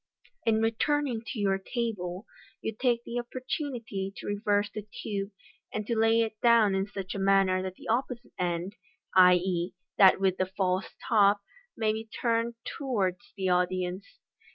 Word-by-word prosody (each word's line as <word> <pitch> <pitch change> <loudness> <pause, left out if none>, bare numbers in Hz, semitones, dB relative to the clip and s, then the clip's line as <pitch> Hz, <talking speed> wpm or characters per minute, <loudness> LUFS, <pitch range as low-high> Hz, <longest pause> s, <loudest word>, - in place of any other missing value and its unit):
In 220 -1 +3
returning 245 +2 +1
to 255 - -5
your 195 -1 +1
table 195 -4 -3 0.3
you 220 - -3
take 240 0 +1
the 240 +1 -3
opportunity 240 -5 -4
to - - -8
reverse 205 0 +1
the 215 - -4 0.2
tube, 200 -2 -3 0.4
and 215 -1 -3
to 235 - -1
lay 225 +1 +4
it 220 -1 -3
down 230 -4 +5
in 190 +1 0
such 195 -2 -6
a 200 - -4
manner 195 -1 +3
that 185 0 -5
the - - -12
opposite 240 +1 -2
end 175 +2 -2 0.4
(i.e., 180 -1 +4 0.2
that 190 -1 +7
with 190 -1 +2
the 185 - 0
false 185 0 -1
top) 205 -3 +4 0.4
may 215 -1 +1
be 220 0 -4 0.2
turned 230 -1 +1
towards 230 -7 -2
the 190 -1 0
audience. 180 +1 -1
205 Hz, 155 wpm, -29 LUFS, 190-230 Hz, 0.4 s, that